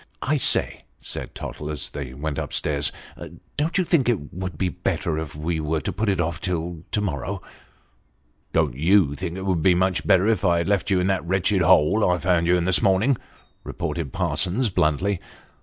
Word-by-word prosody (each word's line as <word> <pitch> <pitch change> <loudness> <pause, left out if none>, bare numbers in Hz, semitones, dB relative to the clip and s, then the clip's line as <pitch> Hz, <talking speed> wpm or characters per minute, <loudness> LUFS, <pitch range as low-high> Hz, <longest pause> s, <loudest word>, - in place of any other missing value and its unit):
" - - -42
I - - +3
say," - - +1
said - - -7
Tottle, 75 - -6
as 75 - -4
they 70 -3 -6
went 75 +1 -3
up - - -5
stairs, 75 -1 +1 0.3
" - - -16
don't 160 +5 0
you 185 - +3
think 160 -8 +2
it 90 -12 -2
would 90 0 -5
be 95 - 0
better 85 -2 -2
if 75 -3 -6
wo 80 0 -1
put 110 +6 -2
it 95 - 0
off 85 -1 -1
till 85 -2 -2
till 85 -2 -10
to 105 - +1
morrow 75 -10 -2
'f - - -11 0.4
" - - -40
" - - -42
Don't - - +2
you 80 +2 +3
think 90 +3 -5
it 95 - -5
would 95 -2 +1
have - - -2
been 90 +2 +4
much 90 -5 0
better 95 +3 +5
if 110 -1 +1
I 85 -3 +3
had 85 - -1
left 100 -1 +1
you 95 -2 +3
in 90 - +1
that 95 -1 0
wretched 95 +1 +1
hole 105 +9 +4
I 90 - +2
found 90 -1 +1
you 90 +1 +4
in 85 - -1
this 95 0 +4
morning? 100 +8 +3 0.3
" - - -35
retorted 80 -6 -4
Parsons 105 +7 0
bluntly. 90 +3 +1
90 Hz, 225 wpm, -23 LUFS, 80-95 Hz, 0.4 s, better